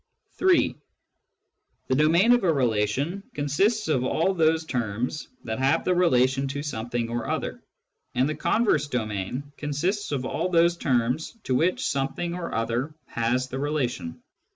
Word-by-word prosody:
(3) 370 -1 +4 1.1
The - - 0
domain 165 - +4
of 245 -2 +4
a 175 - +4
relation 130 - 0
consists 195 - +1
of 140 -5 +1
all 165 +8 +1
those 160 -2 +2
terms 120 +1 -2 0.2
that 110 0 -4
have 135 +1 +2
the 180 - +3
relation 135 -6 +3
to 140 +1 -4
something 120 -4 -3
or 120 -1 -3
other, - - -3 0.5
and 130 +2 +3
the 155 - -1
converse 155 - +1
domain 120 +2 -3
consists 170 +8 -2
of 135 -3 -1
all 180 - -1
those 170 0 +4
terms 130 - 0
to 130 - -1
which 165 +8 +1
something 150 +5 -1
or 175 -1 -4
other 120 +6 -2
has 125 +3 -1
the 130 - -4
relation. 135 - -2
140 Hz, 150 wpm, -26 LUFS, 125-170 Hz, 1.1 s, 3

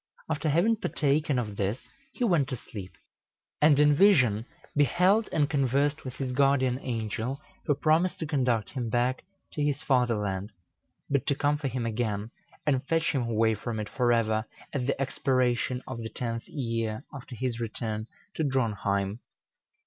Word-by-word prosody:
After 155 0 0
having 185 +10 +3
partaken 145 -5 +1
of 105 -4 -3
this 100 +5 -2 0.2
he 255 - -3
went 170 - +3
to 130 - -2
sleep, 100 -5 -9 0.7
and 150 -1 +6
in 150 0 +6
vision 125 - +4 0.3
beheld 180 - +3
and 150 -2 +2
conversed 140 +1 +1
with 130 -2 -6
his 130 -2 -3
guardian 130 -2 +3
angel, 120 +2 -3 0.3
who 145 - +3
promised 165 +5 +2
to 160 - -3
conduct 125 - 0
him 125 -4 -3
back 125 +3 0 0.3
to 150 - -1
his 145 -1 0
fatherland, 105 -6 0 0.5
but 140 -1 0
to 140 - +2
come 145 +1 +1
for 145 - -2
him 125 -2 -2
again 110 -2 -2 0.3
and 135 -3 +2
fetch 165 0 +2
him 135 - 0
away 115 -1 +2
from 110 +1 -4
it 105 -1 -4
forever 115 -3 +2 0.3
at 130 -3 -1
the 140 - 0
expiration 130 -2 0
of 125 -3 -6
the 115 -1 -5
tenth 115 -1 -4
year 115 -3 -3
after 135 -2 -8
his 120 -1 -2
return 110 -1 -3 0.3
to 160 - -1
Dronheim. 105 -6 0
130 Hz, 160 wpm, -28 LUFS, 115-145 Hz, 0.7 s, and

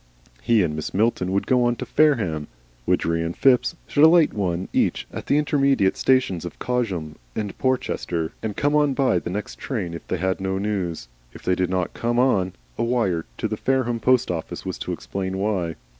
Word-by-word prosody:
He 110 - +3
and 75 -3 -1
Mrs. 80 - -5
Milton 100 -3 +1
would 100 +1 0
go 125 -2 +3
to 120 - -4
Fareham, 110 - +2 0.4
Widgery 85 0 +1
and 85 +1 -3
Phipps 125 +3 +3
should 145 - +2
alight 160 -1 +6
one 95 -3 -1
each - - +1
at - - -6
the 145 - +3
intermediate 140 -9 +2
stations 125 -10 +2
of 85 - -7
Cosham 95 -12 -2 0.2
and 105 -2 -3
Porchester, 85 -10 -1
and 110 -3 -4
come 145 +1 +2
on 145 -2 +3
by 130 -10 +2
the - - -6
next 100 +3 -5
train 100 - -3
if 85 - -8
they 95 - -1
had 95 +2 -1
no 95 0 -1
news. 95 -8 -2 0.3
If - - -12
they 90 - +2
did 90 0 0
not 90 -1 -1
come 120 +1 -1
on, 100 -8 +2 0.3
a - - +2
wire 115 -9 0
to - - -1
the - - -3
Fareham 130 -3 0
post 125 -4 +3
office 85 -2 -5
was - - -4
to - - -4
explain 95 -1 -4
why. 95 -5 -1
100 Hz, 195 wpm, -23 LUFS, 90-125 Hz, 0.4 s, alight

